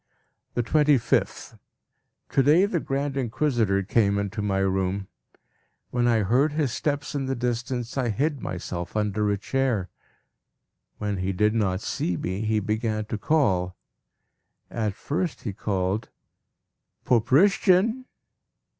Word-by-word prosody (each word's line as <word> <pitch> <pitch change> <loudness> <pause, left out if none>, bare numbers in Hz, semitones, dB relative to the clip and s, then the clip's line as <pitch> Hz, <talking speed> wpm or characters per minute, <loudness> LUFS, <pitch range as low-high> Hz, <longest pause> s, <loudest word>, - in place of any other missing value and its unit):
The 120 - +1
25th. 145 -2 +1 0.7
To 135 - +3
day 155 +8 +5
the 190 -4 -1
Grand 140 -1 -2
Inquisitor 120 -6 +1
came 100 0 +2
into 100 +1 -2
my 100 -2 0
room; 95 0 0 0.8
when 120 -1 +1
I 115 -3 +3
heard 135 +9 +2
his 150 -5 0
steps 145 +2 -2
in 140 -2 -2
the 135 - -1
distance, 120 0 -3
I 125 -2 0
hid 140 +5 -1
myself 90 +1 -5
under 105 0 0
a 100 - +1
chair. 110 -4 -1 1.1
When 105 -1 -2
he 95 +1 -1
did 105 +3 +2
not 100 -4 0
see 90 -4 -2
me, 95 +3 -3
he 110 0 +1
began 110 +1 -1
to 110 0 -4
call. 95 - +1 1.0
At 110 -4 -2
first 160 - -3
he 105 - -3
called 95 +1 -2 1.0
"Poprishchin!" 190 - +3
115 Hz, 130 wpm, -25 LUFS, 100-135 Hz, 1.1 s, day